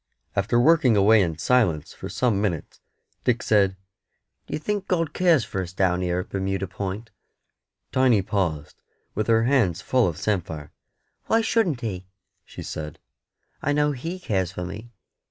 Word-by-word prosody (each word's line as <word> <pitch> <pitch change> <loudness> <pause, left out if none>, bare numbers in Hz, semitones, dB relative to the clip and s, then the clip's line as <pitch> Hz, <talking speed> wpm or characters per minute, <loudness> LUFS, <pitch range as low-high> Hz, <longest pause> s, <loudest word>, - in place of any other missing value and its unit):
After 110 +5 +2
working 130 -5 +5
away 105 +2 +6
in 85 -4 -1
silence 95 -6 +1
for - - -8
some 115 -6 +1
minutes, 90 -7 -3 0.4
Dick 120 -2 +1
said 100 -3 +3 0.7
"D'ye - - -3
think 205 +5 -3
God 165 -4 0
cares 170 -9 +3
for 95 -2 -3
us 90 0 -7
down 95 -1 +1
here 90 0 0
at - - -11
Bermuda 95 0 -2
Point?" 100 +5 -5 0.8
Tiny 125 -6 +3
paused, 85 -7 -2 0.3
with 110 - -2
her 115 -1 +4
hands 115 - +2
full 125 -4 +3
of 85 -3 -3
samphire. 80 -8 -2 0.6
"Why 225 - +3
shouldn't 205 - +1
He?" 95 -5 -4 0.4
she - - -10
said. 75 -1 -6 0.6
"I 145 - +1
know 150 0 +2
He 165 +7 -5
cares 95 - -1
for 90 -1 -5
me. 105 +6 -8
105 Hz, 155 wpm, -24 LUFS, 90-130 Hz, 0.8 s, away